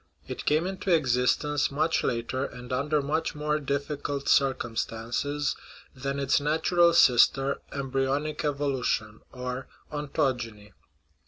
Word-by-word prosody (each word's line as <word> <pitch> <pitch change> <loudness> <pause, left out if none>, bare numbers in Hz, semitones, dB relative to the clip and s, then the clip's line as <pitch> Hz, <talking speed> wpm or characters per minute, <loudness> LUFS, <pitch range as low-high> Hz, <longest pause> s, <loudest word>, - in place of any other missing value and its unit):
It - - -6
came 155 +3 +2
into 190 +1 -4
existence 145 0 +2
much 155 +4 +1
later, 120 +2 -1
and 125 -2 -6
under 145 +3 +1
much 150 +3 -1
more 150 0 0
difficult 140 0 -3
circumstances, 130 +2 0 0.4
than 140 +1 -3
its 140 +1 +2
natural 165 +3 +3
sister, 135 0 +4
embryonic 140 +2 -1
evolution 135 -7 -1
or 125 +1 -5 0.2
ontogeny. 125 -8 -2
140 Hz, 105 wpm, -27 LUFS, 125-150 Hz, 0.4 s, sister